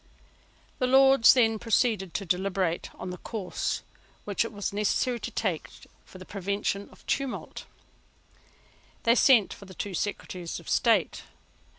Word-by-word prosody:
The 255 Hz, -, +1 dB
Lords 270 Hz, -1 st, +7 dB
then 225 Hz, -3 st, +3 dB
proceeded 220 Hz, -5 st, +1 dB
to 200 Hz, -, -2 dB
deliberate 185 Hz, -1 st, -1 dB
on 180 Hz, -, -6 dB
the 180 Hz, -, -8 dB
course 205 Hz, -6 st, -3 dB, 0.4 s
which 205 Hz, +1 st, 0 dB
it 230 Hz, -, -6 dB
was 205 Hz, -2 st, -4 dB
necessary 210 Hz, +4 st, 0 dB
to -, -, -5 dB
take 185 Hz, -8 st, -2 dB, 0.4 s
for -, -, -13 dB
the 185 Hz, -, -11 dB
prevention 200 Hz, +1 st, -3 dB
of -, -, -20 dB
tumult. 275 Hz, -2 st, -3 dB, 1.4 s
They 230 Hz, -, +5 dB
sent 240 Hz, -4 st, +5 dB
for 200 Hz, -, -13 dB
the 190 Hz, -1 st, -13 dB
two 200 Hz, +2 st, -5 dB
Secretaries 180 Hz, -2 st, -4 dB
of -, -, -16 dB
State. -, -, +2 dB
205 Hz, 145 wpm, -27 LUFS, 185-230 Hz, 1.4 s, Lords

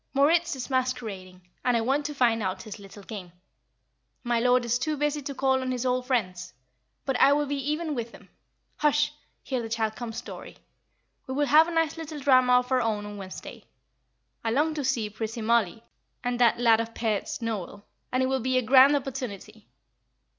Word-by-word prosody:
Moritz 325 Hz, +4 st, +3 dB
is 255 Hz, -, -5 dB
masquerading, 215 Hz, -9 st, -3 dB, 0.2 s
and 245 Hz, -2 st, +2 dB
I -, -, +1 dB
want 275 Hz, +5 st, 0 dB
to 295 Hz, -, -7 dB
find 235 Hz, -4 st, +2 dB
out 190 Hz, -1 st, -3 dB
his 215 Hz, -2 st, -9 dB
little 200 Hz, 0 st, -12 dB
game. 190 Hz, -5 st, -8 dB, 0.9 s
My 240 Hz, -1 st, +1 dB
lord 250 Hz, +1 st, +3 dB
is 235 Hz, +1 st, +1 dB
too 310 Hz, +1 st, -1 dB
busy 295 Hz, +1 st, 0 dB
to 280 Hz, 0 st, -6 dB
call 265 Hz, 0 st, +2 dB
on 255 Hz, 0 st, -2 dB
his 250 Hz, 0 st, -2 dB
old 250 Hz, 0 st, 0 dB
friends. 185 Hz, -, -2 dB, 0.5 s
But 270 Hz, -2 st, -1 dB
I 280 Hz, -, +6 dB
will 295 Hz, 0 st, +1 dB
be 285 Hz, 0 st, -3 dB
even 310 Hz, 0 st, -2 dB
with 235 Hz, -3 st, -4 dB
him. -, -, -15 dB, 0.5 s
Hush! 300 Hz, 0 st, +2 dB, 0.3 s
here 260 Hz, -3 st, -2 dB
the 225 Hz, -, -6 dB
child 220 Hz, -1 st, -1 dB
comes, 235 Hz, -2 st, -5 dB
Dorrie. -, -, -10 dB, 0.7 s
We 260 Hz, -, -4 dB
will 290 Hz, +1 st, +2 dB
have 310 Hz, +3 st, +6 dB
a -, -, -4 dB
nice 325 Hz, -1 st, 0 dB
little 315 Hz, -2 st, -6 dB
drama 255 Hz, -2 st, +4 dB
of 250 Hz, +1 st, +3 dB
our 255 Hz, -1 st, +3 dB
own 215 Hz, -3 st, -1 dB
on 205 Hz, 0 st, -8 dB
Wednesday. 190 Hz, -1 st, -9 dB, 0.8 s
I 225 Hz, -, 0 dB
long 295 Hz, +7 st, +1 dB
to 300 Hz, -2 st, -3 dB
see 255 Hz, -5 st, 0 dB
pretty 220 Hz, +1 st, -5 dB
Mollie, 225 Hz, -2 st, +1 dB, 0.4 s
and 245 Hz, 0 st, -1 dB
that 240 Hz, -2 st, +4 dB
'lad 230 Hz, -2 st, +5 dB
of 230 Hz, 0 st, -4 dB
pairts,' 220 Hz, -3 st, -2 dB
Noel, 210 Hz, -3 st, -5 dB, 0.3 s
and 255 Hz, +1 st, +1 dB
it -, -, +2 dB
will 265 Hz, 0 st, 0 dB
be 255 Hz, +2 st, +1 dB
a 255 Hz, -, +2 dB
grand 265 Hz, +4 st, +7 dB
opportunity." 240 Hz, -6 st, -5 dB
250 Hz, 195 wpm, -27 LUFS, 225-275 Hz, 0.9 s, grand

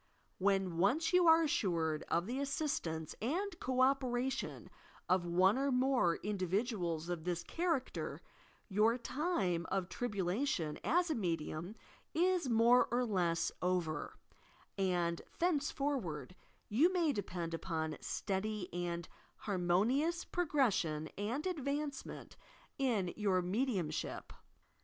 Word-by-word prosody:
When 190 Hz, -3 st, +1 dB
once 305 Hz, -, +2 dB
you 360 Hz, -1 st, +5 dB
are 325 Hz, 0 st, +7 dB
assured 165 Hz, -, 0 dB
of 170 Hz, +1 st, +1 dB
the 250 Hz, +5 st, -3 dB
assistance 275 Hz, -, -2 dB
and 350 Hz, -, -1 dB
co 255 Hz, 0 st, 0 dB
operation 260 Hz, -1 st, 0 dB, 0.4 s
of 180 Hz, -1 st, +2 dB
one 185 Hz, +7 st, +4 dB
or 275 Hz, 0 st, +1 dB
more 250 Hz, -9 st, +3 dB
iudiv 195 Hz, -3 st, -2 dB
iduals 180 Hz, -6 st, -1 dB
of 175 Hz, -3 st, -3 dB
this 175 Hz, -1 st, -2 dB
char 335 Hz, -3 st, +1 dB
acter, 255 Hz, -, -6 dB, 0.5 s
your 215 Hz, +4 st, +3 dB
time 235 Hz, -, -1 dB
of 190 Hz, -2 st, -1 dB
tribulation 195 Hz, -, -1 dB
as 335 Hz, -, +2 dB
a -, -, +3 dB
medium 170 Hz, -, -3 dB, 0.4 s
is 355 Hz, -3 st, +2 dB
more 235 Hz, +2 st, +5 dB
or 245 Hz, +1 st, +1 dB
less 175 Hz, -6 st, +1 dB
over, 175 Hz, -4 st, -1 dB, 0.6 s
and 175 Hz, -3 st, 0 dB, 0.2 s
thenceforward 275 Hz, -, -1 dB, 0.3 s
you 290 Hz, -, +4 dB
may 340 Hz, -5 st, +2 dB
depend 175 Hz, -5 st, -4 dB
upon 160 Hz, -2 st, -2 dB
steady 200 Hz, -1 st, -3 dB
and 175 Hz, -1 st, -3 dB, 0.3 s
harmonious 215 Hz, -, +1 dB
progression 215 Hz, -, +1 dB
and 230 Hz, -, -2 dB
advancement 290 Hz, -4 st, -3 dB, 0.4 s
in 220 Hz, -10 st, +1 dB
your 190 Hz, -4 st, +1 dB
mediumship. 185 Hz, -, -2 dB
210 Hz, 115 wpm, -35 LUFS, 175-275 Hz, 0.6 s, are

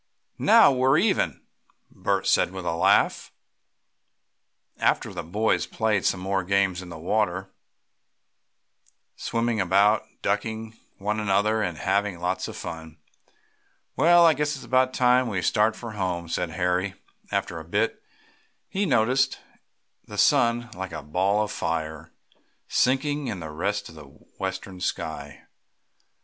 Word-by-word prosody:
"Now -, -, +6 dB
we're 130 Hz, +2 st, +3 dB
even," 195 Hz, +4 st, +1 dB, 0.5 s
Bert -, -, -1 dB
said -, -, +3 dB
with 95 Hz, -1 st, -7 dB
a 85 Hz, -, 0 dB
laugh. 85 Hz, -, +2 dB, 1.5 s
After -, -, +1 dB
this -, -, -12 dB
the -, -, -1 dB
boys 105 Hz, +7 st, 0 dB
played 110 Hz, -4 st, 0 dB
some 90 Hz, -1 st, -1 dB, 0.2 s
games 95 Hz, -2 st, +1 dB
in 90 Hz, -, -10 dB
the 85 Hz, -, -8 dB
water, 95 Hz, +2 st, -1 dB, 1.6 s
swimming 115 Hz, -2 st, -1 dB
about, 100 Hz, +4 st, +3 dB, 0.2 s
"ducking" 110 Hz, +2 st, -2 dB, 0.2 s
one 105 Hz, +2 st, -2 dB
another, 105 Hz, +2 st, +1 dB
and 90 Hz, -6 st, -2 dB
having 100 Hz, +2 st, 0 dB
lots 90 Hz, +2 st, -2 dB
of -, -, -8 dB
fun. 80 Hz, -1 st, -8 dB, 1.0 s
"Well, 170 Hz, +1 st, +6 dB
I 165 Hz, -, +6 dB
guess 150 Hz, +1 st, -1 dB
it's 130 Hz, -, -10 dB
about 130 Hz, +2 st, +2 dB
time 125 Hz, 0 st, +4 dB
we 95 Hz, -5 st, -2 dB
started 110 Hz, +1 st, +2 dB
for 115 Hz, -2 st, -7 dB
home," 90 Hz, -4 st, -3 dB
said 85 Hz, +1 st, -2 dB
Harry, 90 Hz, +3 st, -1 dB, 0.4 s
after -, -, -2 dB
a -, -, -8 dB
bit, -, -, 0 dB
as -, -, -29 dB, 0.7 s
he 195 Hz, +1 st, -1 dB
noticed 130 Hz, 0 st, +2 dB, 0.7 s
the -, -, -8 dB
sun, 120 Hz, 0 st, +3 dB
like 95 Hz, -3 st, -6 dB
a 80 Hz, -, -6 dB
ball 95 Hz, +7 st, +1 dB
of 105 Hz, -, -5 dB
fire, 80 Hz, -2 st, -3 dB, 0.6 s
sinking 140 Hz, +2 st, +1 dB
to 80 Hz, -2 st, -7 dB
rest 100 Hz, +6 st, -2 dB
in -, -, -12 dB
the 75 Hz, -2 st, -12 dB
western 95 Hz, +6 st, -7 dB
sky. 75 Hz, -4 st, -4 dB
100 Hz, 135 wpm, -25 LUFS, 90-120 Hz, 1.6 s, Now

